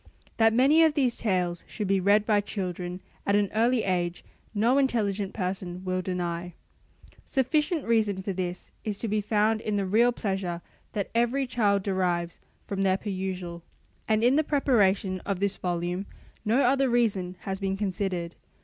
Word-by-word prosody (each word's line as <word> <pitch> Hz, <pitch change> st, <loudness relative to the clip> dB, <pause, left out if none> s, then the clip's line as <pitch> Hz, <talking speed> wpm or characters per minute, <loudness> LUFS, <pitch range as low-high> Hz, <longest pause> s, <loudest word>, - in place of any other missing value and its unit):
That 225 Hz, 0 st, +5 dB
many 270 Hz, +8 st, +5 dB
of 320 Hz, -2 st, +4 dB
these 255 Hz, -5 st, +2 dB
tales 180 Hz, -5 st, 0 dB
should 210 Hz, -3 st, -4 dB
be 195 Hz, 0 st, +2 dB
read 205 Hz, +3 st, +4 dB
by 210 Hz, -2 st, +3 dB
children 180 Hz, -3 st, -4 dB, 0.2 s
at 200 Hz, -, +2 dB
an 205 Hz, -1 st, +2 dB
early 230 Hz, +1 st, +2 dB
age 175 Hz, -2 st, -1 dB, 0.3 s
no 230 Hz, +6 st, +3 dB
intelligent 210 Hz, -7 st, 0 dB
person 185 Hz, -2 st, -4 dB
will 185 Hz, 0 st, 0 dB
deny. 175 Hz, -1 st, -3 dB, 0.7 s
Sufficient 300 Hz, +4 st, 0 dB
reason 215 Hz, -4 st, +1 dB
for 195 Hz, -, -2 dB
this 180 Hz, -1 st, -4 dB
is 210 Hz, -2 st, -3 dB
to 230 Hz, -, -3 dB
be 210 Hz, 0 st, 0 dB
found 215 Hz, +1 st, +1 dB
in 210 Hz, -, -2 dB
the 200 Hz, -, 0 dB
real 225 Hz, +6 st, +4 dB
pleasure 190 Hz, -6 st, -3 dB, 0.3 s
that 200 Hz, -3 st, -3 dB
every 240 Hz, +4 st, +1 dB
child 205 Hz, -6 st, +1 dB
derives 180 Hz, -3 st, -1 dB, 0.3 s
from 195 Hz, -1 st, -3 dB
their 190 Hz, -1 st, +3 dB
perusal: 185 Hz, -4 st, -4 dB, 0.5 s
and 220 Hz, 0 st, +2 dB
in 250 Hz, +4 st, +5 dB
the 310 Hz, -, +4 dB
preparation 205 Hz, -10 st, +2 dB
of 195 Hz, 0 st, -3 dB
this 200 Hz, 0 st, 0 dB
volume 175 Hz, +2 st, -2 dB, 0.4 s
no 235 Hz, +6 st, +3 dB
other 270 Hz, +1 st, +3 dB
reason 205 Hz, -7 st, +1 dB
has 190 Hz, -1 st, -4 dB
been 195 Hz, -1 st, -1 dB
considered. 185 Hz, -4 st, -2 dB
200 Hz, 165 wpm, -27 LUFS, 185-230 Hz, 0.7 s, That